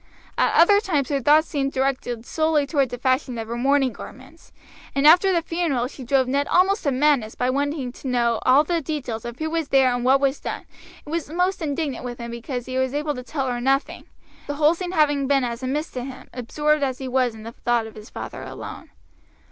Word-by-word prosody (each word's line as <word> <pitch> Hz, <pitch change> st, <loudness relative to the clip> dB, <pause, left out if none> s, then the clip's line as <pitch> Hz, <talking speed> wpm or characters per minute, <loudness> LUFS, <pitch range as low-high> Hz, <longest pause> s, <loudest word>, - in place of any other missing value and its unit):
At -, -, +2 dB
other 405 Hz, +5 st, +7 dB
times 310 Hz, -, -1 dB
her 280 Hz, -2 st, 0 dB
thoughts 300 Hz, +4 st, +4 dB
seemed 275 Hz, -3 st, -2 dB
directed 255 Hz, -3 st, -2 dB
solely 315 Hz, -1 st, +1 dB
toward 280 Hz, -3 st, +1 dB
the 245 Hz, -, -5 dB
fashion 255 Hz, 0 st, 0 dB
of 225 Hz, -1 st, -5 dB
her 235 Hz, -, -4 dB
mourning 270 Hz, +1 st, +2 dB
garments, -, -, -13 dB, 0.4 s
and 275 Hz, +1 st, +1 dB
after 355 Hz, +5 st, +7 dB
the 340 Hz, -2 st, +1 dB
funeral 330 Hz, -8 st, -1 dB
she 270 Hz, 0 st, -10 dB
drove 260 Hz, +1 st, +2 dB
Ned 280 Hz, +2 st, 0 dB
almost 390 Hz, +3 st, +3 dB
to 280 Hz, -, +2 dB
madness 260 Hz, -5 st, +2 dB
by 250 Hz, +1 st, 0 dB
wanting 285 Hz, -1 st, -2 dB
to 265 Hz, -, -9 dB
knew 235 Hz, -3 st, +1 dB
all 265 Hz, +3 st, +5 dB
the 335 Hz, +1 st, -1 dB
details 260 Hz, -8 st, -4 dB
of 235 Hz, 0 st, -6 dB
who 315 Hz, 0 st, -3 dB
was 325 Hz, -2 st, -1 dB
there 265 Hz, -2 st, +4 dB
and 245 Hz, 0 st, -2 dB
what 265 Hz, +2 st, +4 dB
was 275 Hz, 0 st, 0 dB
done, -, -, -5 dB, 0.4 s
and 295 Hz, -, -9 dB
was 335 Hz, -3 st, -2 dB
most 360 Hz, +4 st, 0 dB
indignant 290 Hz, -3 st, -2 dB
with 245 Hz, -1 st, -5 dB
him 235 Hz, -1 st, -7 dB
because 240 Hz, +1 st, -5 dB
he 260 Hz, 0 st, -2 dB
was 260 Hz, +1 st, -1 dB
able 295 Hz, 0 st, -1 dB
to 250 Hz, -, -6 dB
tell 270 Hz, +2 st, -3 dB
her 245 Hz, -2 st, -2 dB
nothing, 270 Hz, +3 st, 0 dB, 0.4 s
the 290 Hz, -, -3 dB
whole 300 Hz, +2 st, +4 dB
scene 360 Hz, +1 st, -5 dB
having 290 Hz, -4 st, +2 dB
been 275 Hz, -1 st, +3 dB
as 235 Hz, 0 st, -3 dB
a 255 Hz, -, -3 dB
mist 300 Hz, +5 st, -2 dB
to 250 Hz, -, -4 dB
him, 260 Hz, 0 st, -9 dB
absorbed 300 Hz, +5 st, 0 dB
as 260 Hz, -2 st, -1 dB
he 265 Hz, -, -6 dB
was 250 Hz, -2 st, +1 dB
in 215 Hz, -, -11 dB
the 230 Hz, -, -7 dB
thought 235 Hz, -1 st, 0 dB
of 220 Hz, -, -10 dB
his 215 Hz, 0 st, -12 dB
father -, -, -7 dB
alone. -, -, -8 dB
275 Hz, 230 wpm, -23 LUFS, 250-300 Hz, 0.4 s, other